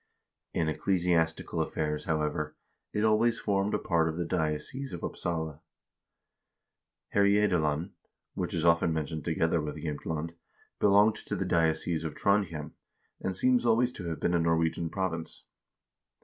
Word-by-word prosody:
1 85 Hz, -, +1 dB
In -, -, -1 dB
ecclesiastical 85 Hz, 0 st, +1 dB
affairs, 75 Hz, -1 st, -2 dB
however, 75 Hz, -1 st, -1 dB, 0.4 s
it 105 Hz, -, -1 dB
always 110 Hz, +2 st, +3 dB
formed 100 Hz, 0 st, 0 dB
a -, -, +3 dB
part 80 Hz, -2 st, +1 dB
of 80 Hz, -, -4 dB
the 85 Hz, -, -1 dB
diocese 85 Hz, -, -2 dB
of 85 Hz, -, -6 dB
Upsala. 80 Hz, -3 st, -3 dB, 1.5 s
Herjedalen, 95 Hz, -6 st, +2 dB, 0.4 s
which -, -, -3 dB
is 85 Hz, 0 st, 0 dB
often 85 Hz, 0 st, +4 dB
mentioned 80 Hz, 0 st, -3 dB
together 80 Hz, 0 st, +1 dB
with 75 Hz, 0 st, -5 dB
Jsemtland, 80 Hz, +1 st, -4 dB, 0.5 s
belonged 105 Hz, +2 st, +5 dB
to 105 Hz, -, -1 dB
the 95 Hz, -, -2 dB
diocese 80 Hz, -1 st, +1 dB
of 80 Hz, -, -4 dB
Trondhjem, 85 Hz, -7 st, 0 dB, 0.5 s
and 95 Hz, -1 st, -2 dB
seems 125 Hz, +2 st, +3 dB
always 120 Hz, +1 st, +3 dB
to 90 Hz, -, -8 dB
have 80 Hz, -1 st, -3 dB
been 85 Hz, -, +1 dB
a 85 Hz, -, +3 dB
Norwegian 80 Hz, 0 st, +1 dB
province. 85 Hz, -3 st, -3 dB
85 Hz, 140 wpm, -29 LUFS, 80-100 Hz, 1.5 s, belonged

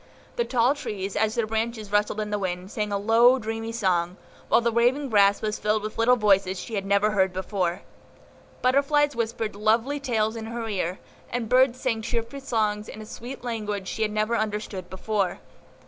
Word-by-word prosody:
The 475 Hz, -, 0 dB
tall 250 Hz, +1 st, +3 dB
trees, 200 Hz, -9 st, -5 dB
as 220 Hz, 0 st, +1 dB
their 235 Hz, -2 st, +1 dB
branches 220 Hz, -1 st, -3 dB
rustled 210 Hz, +1 st, +1 dB
in 210 Hz, 0 st, -4 dB
the 210 Hz, -, 0 dB
wind, 185 Hz, 0 st, -4 dB
sang 210 Hz, -1 st, -2 dB
a 200 Hz, -, +1 dB
low, 230 Hz, +5 st, +5 dB
dreamy 225 Hz, -1 st, -4 dB
song, 185 Hz, -5 st, 0 dB, 0.3 s
while -, -, +5 dB
the 235 Hz, 0 st, +1 dB
waving 250 Hz, +5 st, +2 dB
grass 200 Hz, -2 st, +4 dB
was 215 Hz, -1 st, -2 dB
filled 210 Hz, 0 st, 0 dB
with 215 Hz, +1 st, -5 dB
little 245 Hz, +2 st, +5 dB
voices 195 Hz, -4 st, +2 dB
she 230 Hz, -, -8 dB
had 195 Hz, -2 st, -2 dB
never 200 Hz, +2 st, +3 dB
heard 190 Hz, -2 st, +2 dB
before. 185 Hz, -1 st, -2 dB, 0.8 s
Butterflies 285 Hz, +3 st, +3 dB
whispered 225 Hz, -2 st, -2 dB
lovely 225 Hz, +7 st, +1 dB
tales 225 Hz, -5 st, 0 dB
in 225 Hz, -1 st, -6 dB
her 230 Hz, 0 st, -4 dB
ear, 185 Hz, -3 st, -2 dB, 0.3 s
and 240 Hz, -2 st, -2 dB
birds 255 Hz, +1 st, +4 dB
sang 230 Hz, -4 st, -1 dB
cheerful 230 Hz, +4 st, -3 dB
songs 215 Hz, -5 st, -1 dB
in -, -, -9 dB
a 215 Hz, -, -8 dB
sweet 240 Hz, +4 st, -8 dB
language 210 Hz, -5 st, -3 dB
she 220 Hz, -, -4 dB
had 215 Hz, -1 st, +1 dB
never 215 Hz, +2 st, 0 dB
understood 210 Hz, -4 st, -3 dB
before. 195 Hz, -1 st, -1 dB
220 Hz, 190 wpm, -25 LUFS, 205-235 Hz, 0.8 s, low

